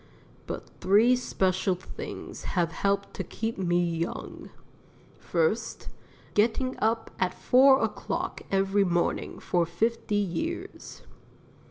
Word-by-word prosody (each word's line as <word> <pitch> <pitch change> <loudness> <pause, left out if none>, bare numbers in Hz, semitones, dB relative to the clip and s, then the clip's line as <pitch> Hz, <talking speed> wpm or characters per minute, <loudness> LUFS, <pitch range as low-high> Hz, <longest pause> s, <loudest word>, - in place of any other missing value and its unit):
But - - -5
three 210 +7 +5
special 190 -6 0
things 180 - -8
have 170 -2 +2
helped 200 +2 -1
to - - -4
keep 225 -2 -4
me 175 -2 +2
young: 170 0 -4 0.7
First 475 -1 -1 0.4
Getting 240 +5 +2
up 225 +1 0
at 185 -1 0
4 265 +2 +5
o'clock - - -3
every 195 +1 +2
morning 175 -2 0
for 175 -1 +1
fifty 210 +6 -1
years. 325 - -3
200 Hz, 110 wpm, -28 LUFS, 180-235 Hz, 0.7 s, three